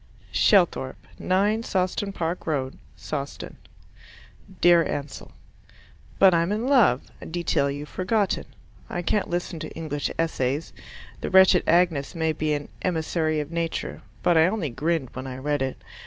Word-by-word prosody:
Shelthorpe, 175 Hz, -9 st, +2 dB
9 205 Hz, +4 st, +1 dB
Sawston 190 Hz, -1 st, -1 dB
Park 170 Hz, -2 st, -3 dB
Road, 135 Hz, -4 st, -2 dB, 0.2 s
Sawston 140 Hz, -2 st, -6 dB, 1.0 s
Dear 175 Hz, -1 st, +6 dB
Ansell, 145 Hz, -2 st, -5 dB, 0.9 s
But 190 Hz, -2 st, +6 dB
I'm 170 Hz, +2 st, +2 dB
in 215 Hz, +3 st, -1 dB
love 235 Hz, -, +4 dB, 0.2 s
a -, -, -8 dB
detail 160 Hz, -4 st, 0 dB
you've 145 Hz, +1 st, -5 dB
forgotten. 195 Hz, +4 st, 0 dB, 0.4 s
I 175 Hz, -, -3 dB
can't 205 Hz, +3 st, 0 dB
listen 175 Hz, -1 st, -3 dB
to 155 Hz, -, -6 dB
English 150 Hz, -3 st, -3 dB
Essays. 150 Hz, -2 st, -1 dB, 0.5 s
The -, -, -4 dB
wretched 190 Hz, -1 st, +6 dB
Agnes 170 Hz, -5 st, +2 dB
may 160 Hz, -1 st, +1 dB
be 155 Hz, 0 st, -1 dB
an 145 Hz, -1 st, -4 dB
"emissary 160 Hz, -3 st, 0 dB
of 150 Hz, +2 st, -7 dB
Nature," 165 Hz, -1 st, -3 dB, 0.2 s
but 170 Hz, -2 st, +4 dB
I 160 Hz, -, +6 dB
only 185 Hz, -, -2 dB
grinned 150 Hz, +1 st, -1 dB
when 130 Hz, +1 st, -6 dB
I 130 Hz, -1 st, -6 dB
read 145 Hz, +1 st, -1 dB
it. 130 Hz, -1 st, -2 dB
165 Hz, 145 wpm, -25 LUFS, 145-185 Hz, 1.0 s, Dear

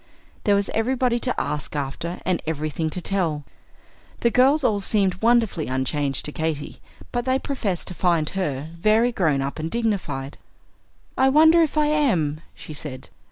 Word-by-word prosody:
There 205 Hz, -, +4 dB
was 200 Hz, 0 st, 0 dB
everybody 245 Hz, +1 st, +1 dB
to 250 Hz, +1 st, -1 dB
ask 150 Hz, 0 st, -3 dB
after, 145 Hz, +5 st, -4 dB
and 185 Hz, -2 st, 0 dB
everything 155 Hz, 0 st, -2 dB
to 180 Hz, +4 st, -4 dB
tell. 170 Hz, -6 st, -1 dB, 0.8 s
The 235 Hz, -, +3 dB
girls 275 Hz, +5 st, +4 dB
all 210 Hz, -5 st, +2 dB
seemed 195 Hz, -2 st, +1 dB
wonderfully 225 Hz, -8 st, +2 dB
unchanged 135 Hz, +1 st, -1 dB
to 150 Hz, -, -3 dB
Katy, 155 Hz, -2 st, -3 dB, 0.3 s
but 240 Hz, -1 st, -1 dB
they 260 Hz, 0 st, +2 dB
professed 225 Hz, -11 st, -3 dB
to -, -, -6 dB
find 170 Hz, -4 st, +1 dB
her 155 Hz, -6 st, -3 dB
very 220 Hz, +6 st, +3 dB
grown 155 Hz, -, +1 dB
up 140 Hz, +3 st, -4 dB
and 160 Hz, +1 st, -3 dB
dignified. 170 Hz, -12 st, -2 dB, 0.8 s
"I 265 Hz, 0 st, +5 dB
wonder 320 Hz, +4 st, +6 dB
if 310 Hz, -1 st, 0 dB
I 300 Hz, -, +4 dB
am," 185 Hz, -, +1 dB
she 155 Hz, -, -9 dB
said. 135 Hz, -3 st, -8 dB
185 Hz, 160 wpm, -23 LUFS, 150-240 Hz, 0.8 s, wonder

